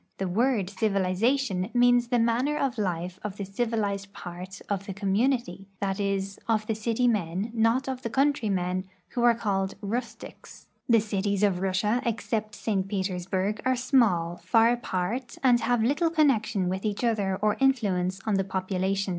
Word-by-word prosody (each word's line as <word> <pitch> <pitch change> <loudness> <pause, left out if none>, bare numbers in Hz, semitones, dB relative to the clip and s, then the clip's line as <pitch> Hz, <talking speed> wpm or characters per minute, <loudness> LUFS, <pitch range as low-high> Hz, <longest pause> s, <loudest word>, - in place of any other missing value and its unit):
The 190 - -2
word 225 +2 +1
civiliza 200 +4 +1
tion 190 -7 -2
means 245 0 +4
the 245 0 +1
manner 240 +6 +1
of 265 -6 -1
life 180 -2 -2
of 205 -1 -5
the 200 - -4
civilized 200 -2 -2
part 180 +2 -8
of 200 -1 -3
the 195 - -5
com 195 -1 -1
munity— 225 -5 0
that 195 0 -2
is, 195 -1 -2
of 220 -2 +1
the 220 - -1
city 225 +3 0
men, 200 -1 -1
not 230 +4 +2
of 260 -1 -3
the 230 - -3
country 270 -3 +1
men, 185 0 -1 0.2
who 245 - -3
are 240 -1 +5
called 195 -3 -1
rustics." 230 +4 -6 0.2
The 230 -2 +5
cities 205 -1 -1
of 195 -3 +2
Russia, 200 +5 +1
except 220 -3 -2
St. 195 -4 -1
Petersburg, 190 +1 -2
are 260 0 +2
small, 215 -10 +2
far 225 +7 +3
apart, 240 +1 -3
and 245 -2 +5
have 235 0 +1
little 290 +8 +2
connection 230 - +2
with 190 +1 -2
each 210 +1 -2
other 205 -5 +1
or 210 +1 +2
influence 195 -9 +1
on 215 - 0
the 195 - +1
population. 190 +1 -1
210 Hz, 170 wpm, -27 LUFS, 190-235 Hz, 0.2 s, are